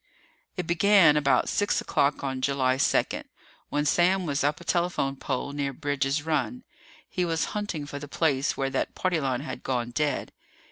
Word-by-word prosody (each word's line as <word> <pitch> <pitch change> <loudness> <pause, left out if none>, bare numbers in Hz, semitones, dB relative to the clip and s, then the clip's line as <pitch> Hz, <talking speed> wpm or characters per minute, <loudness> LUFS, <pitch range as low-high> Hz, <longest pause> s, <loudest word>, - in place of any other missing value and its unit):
It 180 - -2
began 175 -2 +5
about 145 -2 +3
six 205 - +1
o'clock 140 +1 0
on 130 -1 -3
July 130 -1 +1
second, - - +1 0.4
when 145 0 0
Sam 180 +4 +3
was 145 -3 -1
up 145 +1 +1
a - - -11
telephone 170 -6 0
pole 135 +1 -3
near 140 -1 -2
Bridge's 145 0 -1
Run. 160 - -1 0.4
He 180 - -2
was 165 -2 0
hunting 205 -8 -3
for 145 0 -6
the 145 - -8
place 145 -3 0
where 135 0 -1
that - - -2
party 185 -3 0
line 130 -3 -1
had 155 - -6
gone 120 -2 -2
dead. 150 +3 -1
145 Hz, 175 wpm, -27 LUFS, 135-170 Hz, 0.4 s, began